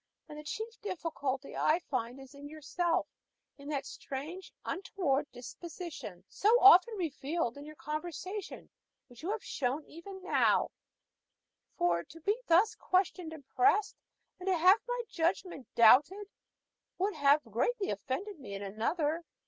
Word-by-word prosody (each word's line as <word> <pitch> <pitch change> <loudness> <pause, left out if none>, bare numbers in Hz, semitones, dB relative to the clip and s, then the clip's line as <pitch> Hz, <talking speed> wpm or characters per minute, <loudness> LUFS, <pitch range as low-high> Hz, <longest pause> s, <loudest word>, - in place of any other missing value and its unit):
And 300 -1 -9
the - - -9
chief 445 +9 -6
difficulty 305 -8 -3
I 310 - +3
find 255 -6 -4
is 270 +1 -13
in 285 +1 -10
yourself 320 +3 -1 0.5
in 280 +1 -9
that 280 -2 -2
strange, 310 +8 -7
untoward 310 -8 -1
disposition 275 - -8
so 415 - +1
often 395 +3 +8
revealed 300 -5 -2
in 285 +1 -9
your 305 0 -10
conversation, 325 +7 -6 0.3
which 245 -3 -15
you 340 - -4
have 440 0 -2
shown 275 +3 -2
even 380 +3 -10
now; 370 - +3 1.1
for 170 -1 +2
to 330 - -14
be 400 +6 +1
thus 380 +7 +5
questioned 365 -4 0
and 295 -4 -11
pressed, 405 +1 +3 0.4
and 365 - -8
to 375 -2 +3
have 370 +6 +6
my - - -1
judgment 335 -4 -1
doubted, 295 - +5 0.7
would 395 +3 0
have 290 -1 +4
greatly 320 - -1
offended 295 - -4
me 200 -7 -7
in 200 - -5
another. 295 - -1
320 Hz, 140 wpm, -32 LUFS, 275-375 Hz, 1.1 s, often